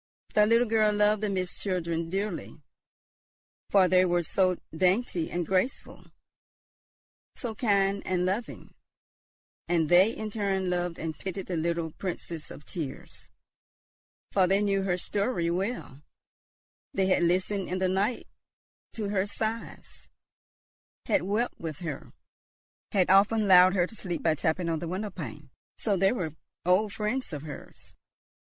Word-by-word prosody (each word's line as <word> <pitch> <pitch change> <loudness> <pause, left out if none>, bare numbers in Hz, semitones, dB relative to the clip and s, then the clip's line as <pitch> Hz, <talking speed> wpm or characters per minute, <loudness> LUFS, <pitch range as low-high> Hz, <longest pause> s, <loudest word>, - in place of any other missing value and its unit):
The 210 0 +5
little 230 +2 +4
girl 215 -1 +3
loved 210 0 +3
the 210 - 0
Mist 185 -2 -3
children 170 -4 -2
dearly, 195 +4 -3 1.1
for 195 -2 +5
they 185 +1 +5
were 175 -1 +2
so 185 +2 +1 0.2
dainty 185 0 +1
and 175 -1 -2
graceful, 190 - -1 1.3
so 240 -5 -5
kind 200 -3 +1
and 180 -1 0
loving. 200 +6 -3 0.9
And 165 -3 +1
they 180 +4 +6
in 220 -2 -5
return 195 -3 -1
loved 175 -1 -1
and 160 -1 -4
pitied 190 +4 -5
the 180 - -3
little 165 0 -1
"Princess 170 -3 -6
of 150 - -11
tears," 150 -6 -7 1.0
for 190 -2 +3
they 195 +2 +2
knew 200 -1 +1
her 185 -2 0
story 200 -2 -1
well; 185 - -3 0.9
they 195 - +2
had 185 -1 +3
listened 185 +3 +1
in 185 - -1
the 185 0 +1
night 195 +6 0 0.7
to 210 -3 -3
her 200 -1 0
sighs, 220 +2 -5 1.0
had - - +2
wept 210 +6 -1
with 160 -3 -5
her, 155 -6 -6 0.8
had 185 -2 +3
often 205 +2 +4
lulled 185 0 +7
her 175 -2 +3
to 225 - -12
sleep 180 -5 -4
by 160 - +4
tapping 160 +3 -1
on 165 -1 0
the 170 - -5
window 195 +4 -3
pane. 150 -4 -8 0.3
So 205 -3 0
they 195 +1 +3
were 175 -10 -3 0.3
old 195 +4 +3
friends 220 +4 -2
of 145 -1 -5
hers. 150 -2 -10
185 Hz, 145 wpm, -28 LUFS, 175-205 Hz, 1.3 s, lulled